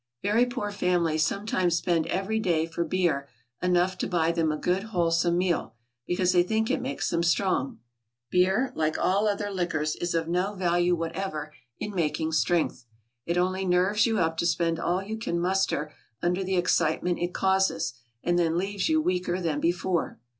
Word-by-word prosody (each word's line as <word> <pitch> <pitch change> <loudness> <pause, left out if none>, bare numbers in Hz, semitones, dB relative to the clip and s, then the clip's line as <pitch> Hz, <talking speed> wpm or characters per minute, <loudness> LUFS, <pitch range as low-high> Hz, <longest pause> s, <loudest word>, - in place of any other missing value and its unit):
= 120 - -60
Very 225 +5 +3
poor 240 -4 -3
families 175 -5 +1
sometimes 185 -1 0
spend 170 -2 0
every 195 +4 -1
day 170 -6 +1
for 165 +1 -3
beer 165 -5 0 0.3
enough 180 0 +1
to - - -1
buy 170 -2 +1
them 165 -2 +1
a 155 - -2
good, 180 +4 0
wholesome 170 -4 +1
meal, 175 -11 0 0.3
because 180 0 +1
they 180 -1 +5
think 220 +5 0
it - - 0
makes 270 +2 -2
them 170 - +1
strong. 170 -4 +1 0.5
Beer, 190 +8 +2
like 155 -5 0
all 200 +3 +2
other 205 0 -1
liquors, 160 -5 -1
is 175 -1 -2
of 165 -1 0
no 180 +4 0
value 175 -1 +2
whatever 165 -2 -4 0.2
in 210 - -5
making 160 -2 -1
strength; 160 -5 0 0.4
it 170 +1 0
only 185 +2 +1
nerves 190 +4 +3
you 225 -1 0
up 165 -3 0
to 170 - +1
spend 170 -1 0
all 180 +2 0
you 220 +3 -5
can 170 -6 -2
muster 180 -4 0 0.3
under 180 +2 0
the 190 0 -1
excitement 175 0 +1
it 175 +1 -1
causes, 190 -9 +1 0.3
and 175 0 +2
then 165 -1 +1
leaves 200 - -1
you 315 0 +3
weaker 180 - 0
than 160 -5 -1
before. 175 -1 -1
180 Hz, 180 wpm, -27 LUFS, 165-190 Hz, 0.5 s, they